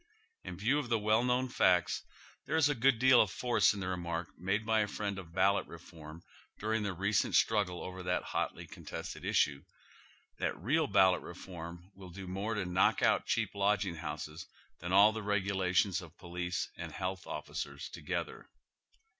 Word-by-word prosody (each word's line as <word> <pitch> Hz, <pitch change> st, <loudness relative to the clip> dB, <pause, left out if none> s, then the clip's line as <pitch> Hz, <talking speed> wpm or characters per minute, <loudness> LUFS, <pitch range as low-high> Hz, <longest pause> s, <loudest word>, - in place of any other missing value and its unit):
In 90 Hz, -2 st, -7 dB
view 125 Hz, +9 st, +2 dB
of 125 Hz, -5 st, -5 dB
the 115 Hz, -, +3 dB
well 110 Hz, +2 st, +2 dB
known 125 Hz, +1 st, +1 dB
facts, 90 Hz, -7 st, +2 dB, 0.5 s
there 150 Hz, -, -1 dB
is 160 Hz, -2 st, +5 dB
a -, -, +2 dB
good 130 Hz, 0 st, +3 dB
deal 130 Hz, +1 st, +6 dB
of 105 Hz, -, +1 dB
force 120 Hz, +4 st, +2 dB
in 100 Hz, -, -5 dB
the 90 Hz, -, -3 dB
remark 85 Hz, -2 st, -3 dB
made 95 Hz, +5 st, -1 dB
by 110 Hz, 0 st, +3 dB
a 105 Hz, -, +2 dB
friend 100 Hz, -1 st, -3 dB
of 85 Hz, -3 st, -11 dB
ballot 95 Hz, +3 st, +2 dB
re 85 Hz, -, -9 dB
form 80 Hz, -1 st, -12 dB, 0.3 s
during 110 Hz, +1 st, -1 dB
tlie 100 Hz, -4 st, -3 dB
recent 100 Hz, +2 st, +1 dB
struggle 100 Hz, -5 st, +2 dB
over 95 Hz, 0 st, -7 dB
tliat 90 Hz, 0 st, 0 dB
hotly -, -, -3 dB
contested -, -, -8 dB
issue, 70 Hz, -2 st, +2 dB, 0.8 s
that -, -, -1 dB
real 145 Hz, -, +1 dB
ballot 95 Hz, -3 st, +4 dB
reform 85 Hz, 0 st, -9 dB
will 95 Hz, -1 st, -12 dB
do 95 Hz, +2 st, -8 dB
more 100 Hz, +5 st, -3 dB
to 105 Hz, -3 st, -2 dB
knock 90 Hz, +1 st, +2 dB
out -, -, +3 dB
cheap -, -, 0 dB
lodging 100 Hz, -2 st, +1 dB
liouses 75 Hz, +2 st, -6 dB, 0.3 s
than 85 Hz, +2 st, -5 dB
ail 100 Hz, +3 st, +7 dB
the 110 Hz, 0 st, -5 dB
regulations 95 Hz, -2 st, +1 dB
of 85 Hz, -1 st, -13 dB
police 90 Hz, 0 st, -3 dB
and -, -, -6 dB
health 95 Hz, +1 st, -4 dB
oflicers 75 Hz, -2 st, -5 dB
together. -, -, -5 dB
95 Hz, 180 wpm, -32 LUFS, 90-110 Hz, 0.8 s, ail